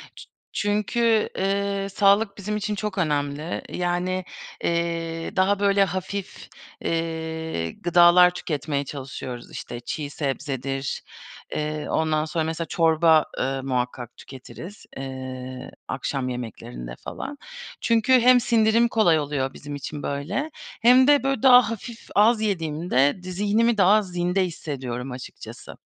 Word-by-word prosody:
Çü -, -, -12 dB, 0.2 s
çünkü, 215 Hz, +2 st, +1 dB
ııı, 200 Hz, 0 st, 0 dB
sağlık 200 Hz, +1 st, +3 dB
bizim 210 Hz, +1 st, -3 dB
için 210 Hz, 0 st, -2 dB
çok 210 Hz, -1 st, -4 dB
önemli. 150 Hz, -1 st, -1 dB
Yani, 180 Hz, +1 st, -1 dB, 0.4 s
eee, 165 Hz, +1 st, -2 dB
daha, 195 Hz, +1 st, +2 dB
böyle, 200 Hz, 0 st, +4 dB
hafif, 190 Hz, +1 st, -5 dB, 0.3 s
eee, 160 Hz, -, -3 dB
gıdalar 175 Hz, -, +6 dB
tüketmeye 145 Hz, -5 st, -3 dB
çalışıyoruz. 130 Hz, -3 st, -7 dB
İşte, 120 Hz, -, -7 dB
çiğ 145 Hz, +4 st, -5 dB
sebzedir, 135 Hz, -1 st, -3 dB, 0.5 s
eee, 150 Hz, 0 st, -3 dB
ondan 155 Hz, -1 st, +1 dB
sonra 160 Hz, +1 st, -1 dB
mesela 160 Hz, +1 st, -3 dB
çorba, 160 Hz, -1 st, +4 dB
ııı, 135 Hz, 0 st, -1 dB
muhakkak 125 Hz, -2 st, -3 dB
tüketiriz, 170 Hz, +9 st, -11 dB
eee, 130 Hz, -1 st, -7 dB, 0.2 s
akşam 135 Hz, -2 st, -2 dB
yemeklerinde -, -, -7 dB
falan. 285 Hz, -, -7 dB, 0.4 s
Çünkü 230 Hz, +2 st, +3 dB
hem 250 Hz, +1 st, +7 dB
sindirim 230 Hz, 0 st, +3 dB
kolay 210 Hz, -9 st, +3 dB
oluyor 140 Hz, -2 st, -2 dB
bizim 145 Hz, 0 st, -7 dB
için 145 Hz, +1 st, -6 dB
böyle 180 Hz, -, -3 dB, 0.3 s
hem 250 Hz, +2 st, +6 dB
de, 290 Hz, -1 st, +5 dB
böyle, 270 Hz, -4 st, -1 dB
daha 250 Hz, -4 st, +7 dB
hafif, 230 Hz, +1 st, -8 dB
az 220 Hz, +2 st, +5 dB
yediğimde, 165 Hz, -5 st, 0 dB
di 185 Hz, -, -6 dB
zihnimi 210 Hz, +5 st, +2 dB
daha 205 Hz, +2 st, +5 dB
zinde 180 Hz, 0 st, 0 dB
hissediyorum 135 Hz, -6 st, -5 dB
açıkçası. 125 Hz, 0 st, -9 dB
170 Hz, 125 wpm, -24 LUFS, 140-205 Hz, 0.5 s, hem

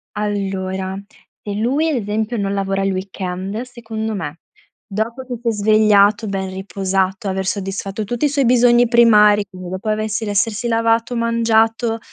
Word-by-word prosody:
Allora, 190 Hz, -2 st, -3 dB, 0.5 s
se 205 Hz, -, -4 dB
lui 265 Hz, +9 st, +1 dB
ad 310 Hz, -, 0 dB
esempio, 215 Hz, +3 st, -2 dB
non 200 Hz, -1 st, -1 dB
lavora 195 Hz, 0 st, -1 dB
il 195 Hz, -, +1 dB
weekend, 190 Hz, +2 st, -4 dB
secondo 225 Hz, -3 st, -5 dB
me, 165 Hz, -4 st, -5 dB, 0.5 s
dopo 225 Hz, +5 st, -3 dB
che 250 Hz, -1 st, -5 dB
si 240 Hz, -, -5 dB
è -, -, +2 dB
svegliato, 210 Hz, 0 st, +3 dB
ben 190 Hz, -1 st, -3 dB
riposato, 190 Hz, 0 st, -2 dB
aver 190 Hz, 0 st, -2 dB
soddisfatto 195 Hz, +1 st, -3 dB
tutti 240 Hz, +6 st, -2 dB
i -, -, +3 dB
suoi 280 Hz, -1 st, +1 dB
bisogni 240 Hz, 0 st, +5 dB
primari, 210 Hz, -3 st, +5 dB
quindi 185 Hz, -2 st, -9 dB
dopo 190 Hz, +4 st, -4 dB
avessi 215 Hz, +1 st, -1 dB
l'essersi 210 Hz, +3 st, 0 dB
lavato, 230 Hz, +1 st, +1 dB
mangiato 230 Hz, 0 st, +1 dB
210 Hz, 155 wpm, -19 LUFS, 195-230 Hz, 0.5 s, bisogni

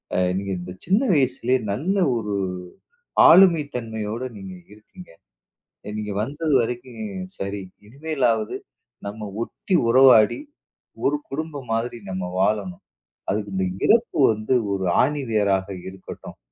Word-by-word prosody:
அ -, -, +1 dB, 0.2 s
நீங்க 100 Hz, 0 st, -3 dB
இந்தச் 90 Hz, +1 st, -9 dB
சின்ன 195 Hz, +5 st, +3 dB
வயசுலயே 130 Hz, -3 st, +1 dB
நல்ல 175 Hz, -, -1 dB, 0.2 s
ஒரு 105 Hz, -2 st, -3 dB, 1.0 s
ஆளுமைத்தன்மையோட 125 Hz, -, +3 dB
நீங்க 95 Hz, -1 st, -8 dB, 0.2 s
இருக்கீங்க. 145 Hz, -, -15 dB, 0.9 s
நீங்க 105 Hz, -1 st, -4 dB
வந்தது 145 Hz, +5 st, -1 dB
வரைக்கும் 120 Hz, -, -6 dB, 0.4 s
சரி. 100 Hz, 0 st, -4 dB, 0.2 s
இனிமேலாவது 125 Hz, -5 st, -1 dB, 0.5 s
நம்ம 105 Hz, +1 st, -6 dB, 0.2 s
ஒட்டி 185 Hz, +9 st, -4 dB
உறவாடி 125 Hz, -, +6 dB, 0.7 s
ஒரு 145 Hz, -, +2 dB
குடும்பம் 145 Hz, -4 st, -5 dB
மாதிரி 120 Hz, +1 st, -2 dB
நம்ம 95 Hz, -1 st, -3 dB, 0.2 s
வாழணும். 100 Hz, -3 st, 0 dB, 0.5 s
அதுக்கு 105 Hz, 0 st, -2 dB
இந்த 95 Hz, 0 st, 0 dB, 0.2 s
இறப்பு 235 Hz, +1 st, +3 dB, 0.2 s
வந்து 110 Hz, +4 st, -2 dB, 0.2 s
ஒரு 95 Hz, -1 st, -2 dB, 0.2 s
ஆணிவேராக 105 Hz, -9 st, 0 dB, 0.2 s
இருக்கட்டும், 95 Hz, 0 st, -10 dB
115 Hz, 110 wpm, -23 LUFS, 105-140 Hz, 1.0 s, உறவாடி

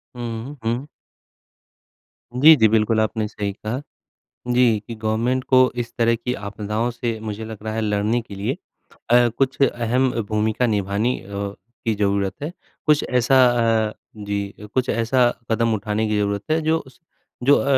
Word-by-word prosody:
हुँ, 120 Hz, +3 st, -5 dB
हुँ। 120 Hz, +5 st, -1 dB, 1.5 s
जी, 150 Hz, +6 st, +8 dB
जी, 110 Hz, -6 st, +5 dB
बिल्कुल, 110 Hz, +1 st, +2 dB
आपने 110 Hz, 0 st, 0 dB
सही 105 Hz, -1 st, -3 dB
कहा। 110 Hz, +6 st, -4 dB, 0.7 s
जी, 120 Hz, -3 st, +4 dB
कि 115 Hz, -, -6 dB
गवर्नमेंट 115 Hz, +4 st, -1 dB
को 130 Hz, -1 st, +5 dB
इस 120 Hz, 0 st, -3 dB
तरह 115 Hz, 0 st, +3 dB
की 125 Hz, +2 st, -3 dB
आपदाओं 105 Hz, +3 st, -3 dB
से 120 Hz, -1 st, -3 dB
मुझे 110 Hz, 0 st, -5 dB
लग 110 Hz, -1 st, -7 dB
रहा 110 Hz, 0 st, -3 dB
है 110 Hz, -, -1 dB
लड़ने 105 Hz, +2 st, +1 dB
के 110 Hz, -3 st, -10 dB
लिए 100 Hz, +1 st, -2 dB, 0.6 s
अ, 120 Hz, 0 st, +6 dB
कुछ 135 Hz, 0 st, 0 dB
अहम 125 Hz, 0 st, +2 dB, 0.2 s
भूमिका 110 Hz, +3 st, +1 dB
निभानी 105 Hz, +3 st, 0 dB
अ, -, -, -15 dB, 0.6 s
की 110 Hz, -2 st, +1 dB
ज़रूरत 100 Hz, -1 st, 0 dB
है। 155 Hz, -, -3 dB, 0.3 s
कुछ 150 Hz, -1 st, +4 dB
ऐसा 125 Hz, +1 st, +3 dB, 0.5 s
अ, -, -, -10 dB, 0.2 s
जी 100 Hz, -1 st, -3 dB
अ, 105 Hz, -, -9 dB
कुछ 130 Hz, -1 st, 0 dB
ऐसा 120 Hz, +2 st, +3 dB, 0.2 s
कदम 115 Hz, 0 st, +2 dB
उठाने 110 Hz, +1 st, -1 dB
की 105 Hz, 0 st, 0 dB
ज़रूरत 100 Hz, 0 st, 0 dB
है 160 Hz, -, +3 dB
जो 160 Hz, +1 st, +2 dB
उस 130 Hz, -5 st, -15 dB, 0.4 s
जो 140 Hz, +3 st, +6 dB
अ, -, -, +1 dB
115 Hz, 165 wpm, -22 LUFS, 105-125 Hz, 1.5 s, जी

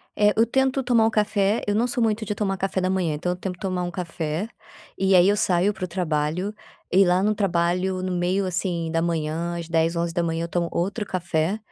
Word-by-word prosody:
É, 210 Hz, 0 st, +4 dB
eu 225 Hz, -, +5 dB
tento 265 Hz, +2 st, +1 dB
tomar 240 Hz, -3 st, +3 dB
o 225 Hz, -, +2 dB
café 210 Hz, 0 st, +1 dB
eu 205 Hz, -, 0 dB
não 235 Hz, +4 st, +2 dB
sou 245 Hz, -1 st, 0 dB
muito 220 Hz, 0 st, 0 dB
de 210 Hz, -, -3 dB
tomar 195 Hz, -2 st, -1 dB
café 190 Hz, 0 st, -1 dB
da 185 Hz, -, 0 dB
manhã, 185 Hz, -4 st, 0 dB
então 165 Hz, +4 st, -2 dB
eu -, -, -2 dB
tento 180 Hz, 0 st, -5 dB
tomar 185 Hz, -2 st, -2 dB
um 175 Hz, -, -3 dB
café 170 Hz, +1 st, -3 dB, 0.5 s
e 190 Hz, 0 st, +3 dB
aí 180 Hz, +1 st, +6 dB
eu 205 Hz, -, +2 dB
saio 195 Hz, 0 st, +2 dB
para 190 Hz, -1 st, -4 dB
o -, -, -8 dB
trabalho 170 Hz, +2 st, -1 dB, 0.4 s
e 195 Hz, +1 st, +5 dB
lá 180 Hz, +2 st, +2 dB
no 215 Hz, -, +2 dB
trabalho 185 Hz, -1 st, 0 dB
no 185 Hz, -, -2 dB
meio, 180 Hz, +2 st, 0 dB
assim 175 Hz, -2 st, -2 dB
da 165 Hz, 0 st, +1 dB
manhã, 165 Hz, +1 st, -2 dB
às 170 Hz, -1 st, -6 dB
10h, 165 Hz, +1 st, +1 dB
11h, 170 Hz, -1 st, -1 dB
eu -, -, -3 dB
tomo 170 Hz, 0 st, 0 dB
outro 200 Hz, +5 st, -2 dB
café 175 Hz, 0 st, -1 dB
185 Hz, 225 wpm, -24 LUFS, 170-205 Hz, 0.5 s, aí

